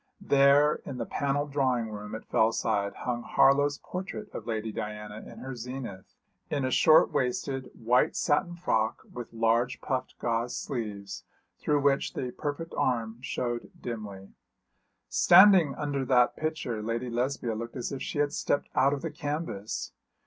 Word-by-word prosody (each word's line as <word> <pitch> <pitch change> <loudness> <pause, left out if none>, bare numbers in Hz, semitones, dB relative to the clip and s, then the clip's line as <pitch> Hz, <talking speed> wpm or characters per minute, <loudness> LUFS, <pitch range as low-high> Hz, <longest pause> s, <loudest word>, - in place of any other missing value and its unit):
There 145 -4 +4
in 135 - -6
the 115 - -3
panelled 145 +3 -1
drawing 130 -5 0
room 105 +1 -6
at 110 - -8
Fellside 110 -2 +1
hung 120 -1 -1
Harlow's 145 +3 +3
portrait 195 +3 -7
of - - -7
Lady 110 -1 -2
Diana 105 0 -6
in - - -12
her 130 0 -6
zenith, 120 -5 -7 0.3
in 140 -3 -1
a 130 - -1
short 155 +3 +6
waisted, 130 +1 -1
white 120 +2 +2
satin 175 +4 +1
frock, 110 -10 0
with 120 -1 -7
large 115 +2 +1
puffed 130 -2 -3
gauze 120 +1 -1
sleeves, 105 -6 -5 0.4
through 145 -1 +1
which 140 -1 +2
the 125 -1 -3
perfect 150 +4 -5
arm 115 -2 -1
showed 120 -3 -3
dimly. 105 -5 -6 0.8
Standing 180 -5 +6
under 145 -2 -2
that 125 -1 +3
picture 155 -8 -3
Lady 115 +3 -3
Lesbia 120 -1 -1
looked 115 +3 -6
as 125 - -4
if 135 - -5
she - - -4
had 145 0 +1
stepped 145 - -1
out 135 +2 +3
of 140 - -4
the - - -3
canvas. 145 -9 -4
125 Hz, 155 wpm, -28 LUFS, 115-145 Hz, 0.8 s, short